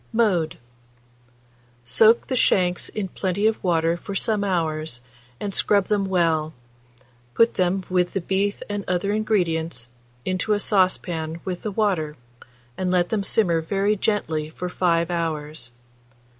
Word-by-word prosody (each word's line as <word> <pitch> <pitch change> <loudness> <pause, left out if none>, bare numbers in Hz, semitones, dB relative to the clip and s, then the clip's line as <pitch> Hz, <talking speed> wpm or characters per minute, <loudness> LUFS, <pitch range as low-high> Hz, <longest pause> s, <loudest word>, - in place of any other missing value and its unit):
Mode. 190 -9 +1 1.3
Soak 220 - +4
the 260 - -2
shanks 180 -6 +2
in 210 -3 -3
plenty 190 +3 -1
of 220 0 +1
water 165 -2 +2
for 195 +3 -7
some 210 +1 +1
hours, 160 -8 -1 0.4
and 200 -1 -4
scrub 200 -1 +2
them 205 -2 +2
well; 165 -4 +1 0.8
put 230 0 +4
them, 185 +1 0
with 180 -1 +1
the 195 - -1
beef 195 +3 -1
and 205 -1 -3
other 180 +3 0
ingredients, 165 - 0 0.4
into 185 +3 0
a 205 - +1
saucepan 175 -5 0
with 180 -2 -4
the 215 - -3
water, 180 -8 0 0.6
and 185 -1 0
let 180 -1 +2
them 215 -2 0
simmer 180 -5 +2
very 195 +5 +1
gently 160 -7 -1
for 180 +3 -5
5 170 -1 +1
hours. 155 -6 -3
185 Hz, 140 wpm, -23 LUFS, 165-205 Hz, 1.3 s, Soak